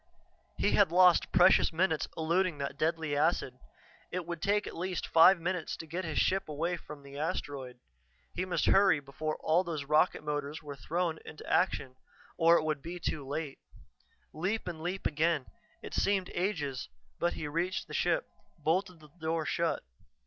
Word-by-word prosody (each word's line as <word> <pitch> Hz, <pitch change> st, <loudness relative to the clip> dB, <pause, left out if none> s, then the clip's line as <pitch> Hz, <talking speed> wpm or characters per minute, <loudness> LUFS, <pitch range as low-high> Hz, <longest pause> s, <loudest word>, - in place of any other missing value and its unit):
He 100 Hz, +4 st, +2 dB
had 105 Hz, +9 st, +4 dB
lost 180 Hz, 0 st, +5 dB
precious 185 Hz, +1 st, +5 dB
minutes 160 Hz, -1 st, +1 dB
eluding 170 Hz, +1 st, +1 dB
that 140 Hz, -1 st, -4 dB
deadly 160 Hz, 0 st, 0 dB
acid. 145 Hz, -4 st, +1 dB, 0.5 s
It 180 Hz, -1 st, -3 dB
would 170 Hz, -1 st, -5 dB
take 205 Hz, +1 st, +1 dB
at -, -, -7 dB
least 180 Hz, +1 st, -3 dB
five 170 Hz, +3 st, +6 dB
minutes 175 Hz, -1 st, -2 dB
to -, -, -7 dB
get 170 Hz, +4 st, -4 dB
his 160 Hz, -, -3 dB
ship 190 Hz, -3 st, +1 dB
away 165 Hz, +4 st, -1 dB
from 150 Hz, -4 st, -11 dB
the 140 Hz, 0 st, -9 dB
asteroid; 145 Hz, -6 st, -4 dB, 0.6 s
he 180 Hz, -, -2 dB
must 185 Hz, -1 st, -1 dB
hurry 195 Hz, -6 st, +5 dB
before 145 Hz, +3 st, -4 dB
all 165 Hz, +4 st, +3 dB
those 160 Hz, -5 st, -4 dB
rocket 150 Hz, +2 st, +2 dB
motors 150 Hz, +1 st, -3 dB
were 145 Hz, -1 st, -7 dB
thrown 165 Hz, +3 st, -2 dB
into 155 Hz, -, -11 dB
action, 130 Hz, -8 st, +1 dB, 0.4 s
or 165 Hz, +1 st, +5 dB
it -, -, 0 dB
would 155 Hz, -3 st, -1 dB
be 175 Hz, +3 st, -6 dB
too 155 Hz, -3 st, -3 dB
late. 145 Hz, 0 st, -4 dB, 0.7 s
Leap 190 Hz, +8 st, -2 dB
and 165 Hz, -3 st, -5 dB
leap 180 Hz, +3 st, -4 dB
again. 155 Hz, -2 st, +1 dB, 0.4 s
It -, -, -8 dB
seemed 195 Hz, -2 st, +1 dB
ages, 155 Hz, -8 st, -2 dB, 0.3 s
but 175 Hz, -, +1 dB
he 150 Hz, -, -5 dB
reached 175 Hz, +5 st, -2 dB
the -, -, -10 dB
ship, -, -, +1 dB, 0.3 s
bolted 170 Hz, +2 st, -1 dB
the 150 Hz, -, -15 dB
door 160 Hz, 0 st, -1 dB
shut. 170 Hz, -1 st, 0 dB
165 Hz, 170 wpm, -31 LUFS, 150-180 Hz, 0.7 s, five